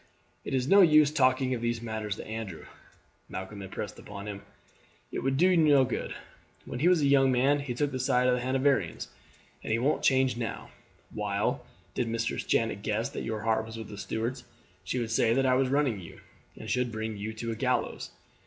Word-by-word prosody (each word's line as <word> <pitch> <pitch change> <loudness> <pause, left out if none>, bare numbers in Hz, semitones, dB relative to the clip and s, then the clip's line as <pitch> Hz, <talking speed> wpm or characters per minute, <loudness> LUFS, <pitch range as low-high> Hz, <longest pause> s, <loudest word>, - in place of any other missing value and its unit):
"It - - -2
is 130 0 0
no 200 +5 +7
use 155 -4 +6
talking 130 -3 +2
of 120 - -3
these 120 0 -1
matters 110 -3 -4
to - - -8
Andrew," 110 -6 -6 0.6
Malcolm 95 +2 -6
impressed 100 +2 -6
upon 100 0 -9
him; 100 -1 -6 0.7
"it - - -3
would 135 0 0
do 185 +4 +4
no 145 -5 +5
good. 125 - -4 0.5
When 125 - -5
he 160 - +3
was 180 -4 +4
a - - +4
young 135 -1 +5
man 135 +3 +3
he 135 -4 -4
took 145 +3 0
the 130 - -3
side 125 -1 +2
of 125 - +4
the 125 - 0
Hanoverians, 130 - 0 0.5
and - - -5
he 115 - +3
won't 135 +6 +1
change 130 -2 +3
now; 115 -2 -5 0.4
while, 105 -1 -1 0.3
did 120 - -1
Mistress 115 0 -2
Janet 115 -3 0
guess 110 +2 -1
that - - -6
your 110 -1 -3
heart 110 0 +1
was 110 0 -8
with 110 -2 -7
the - - -8
Stuarts, 115 +6 -3 0.4
she - - -3
would 115 -2 -2
say 115 0 +3
that 135 0 +2
I 130 - +4
was 130 0 +2
ruining 135 -6 +1
you, 85 - -12 0.4
and - - -9
should 125 -1 0
bring 110 0 -4
you 105 +2 -4
to 115 +1 -4
a - - -3
gallows. - - -1
120 Hz, 210 wpm, -29 LUFS, 110-135 Hz, 0.7 s, no